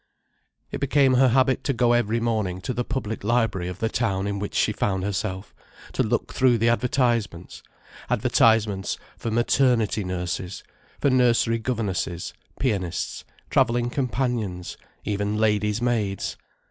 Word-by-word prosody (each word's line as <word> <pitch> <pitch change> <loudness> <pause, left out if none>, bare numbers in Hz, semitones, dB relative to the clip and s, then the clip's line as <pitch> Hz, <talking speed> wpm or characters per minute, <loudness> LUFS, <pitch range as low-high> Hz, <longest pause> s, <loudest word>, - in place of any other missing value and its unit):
It - - -4
became 135 -1 +3
her 130 +1 +5
habit 130 +1 +2
to 140 - +1
go 120 0 +3
every 115 -1 +1
morning 110 -6 -1
to 125 - -3
the 125 - -1
public 115 -5 -4
library 115 -5 +1
of 90 -1 -5
the 115 - 0
town 100 -5 -1
in 100 0 -2
which 105 - -5
she - - +2
found 95 -2 -1
herself, 100 -1 -3 0.4
to - - +1
look - - -1
through 125 -2 +4
the 115 +1 +2
advertisements: 120 -7 0 0.5
advertisements 115 -4 +2 0.2
for 115 - -4
maternity 120 -2 +2
nurses, 90 0 -4 0.4
for 140 - +2
nursery 120 -2 +3
governesses, 105 -7 -2 0.3
pianists, 100 -10 -2 0.3
travelling 120 +1 +2
companions, 120 -8 -2 0.3
even 105 +1 -1
ladies' 105 +1 +1
maids. 105 -6 -1
115 Hz, 135 wpm, -24 LUFS, 100-125 Hz, 0.5 s, her